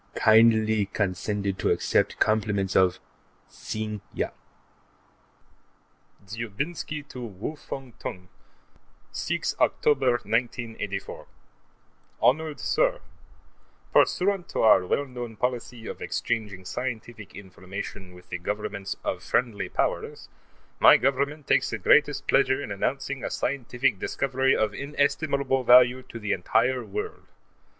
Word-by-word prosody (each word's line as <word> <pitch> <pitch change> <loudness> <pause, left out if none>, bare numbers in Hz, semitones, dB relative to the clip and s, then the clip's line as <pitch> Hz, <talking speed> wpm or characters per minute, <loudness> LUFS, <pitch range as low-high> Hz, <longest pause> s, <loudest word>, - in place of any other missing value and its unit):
Kindly 110 -2 +4
condescend 100 0 -2
to - - +1
accept - - +1
compliments 105 -3 +1
of, 95 -1 +4 0.5
Sing 110 -1 -5
Yat - - -2 1.9
Dzhoubinsky 140 - -5
to 125 - -8
Wu 110 +7 -6
Fung 135 -4 -8
Tung: 90 -1 -6 0.8
6 - - -2
October, 135 -3 +3
1984 115 -3 -3 0.9
Honored 155 +2 +2
Sir: - - +1 0.9
Pursuant 195 -1 +2
to - - -2
our 105 -4 +6
well 145 - +1
known 120 -3 -7
policy 120 0 -3
of - - -7
exchanging 105 -5 -3
scientific 110 0 -5
information 95 -1 -8
with 90 0 -16
the 90 - -4
Governments 100 +1 -4
of - - -2
friendly 120 -5 -1
Powers, - - -2 0.5
my - - +8
Government 140 +2 0
takes - - +2
the 115 - -3
greatest 145 +8 +3
pleasure 130 -1 +3
in 125 - -6
announcing 135 +6 -2
a - - -2
scientific 125 -4 -1
discovery 135 +3 +1
of 110 -1 0
inestimable 140 -1 0
value 125 +1 +6
to 120 - -10
the 105 -2 -3
entire 115 +8 +1
world. 420 +1 -6
115 Hz, 110 wpm, -26 LUFS, 105-135 Hz, 1.9 s, my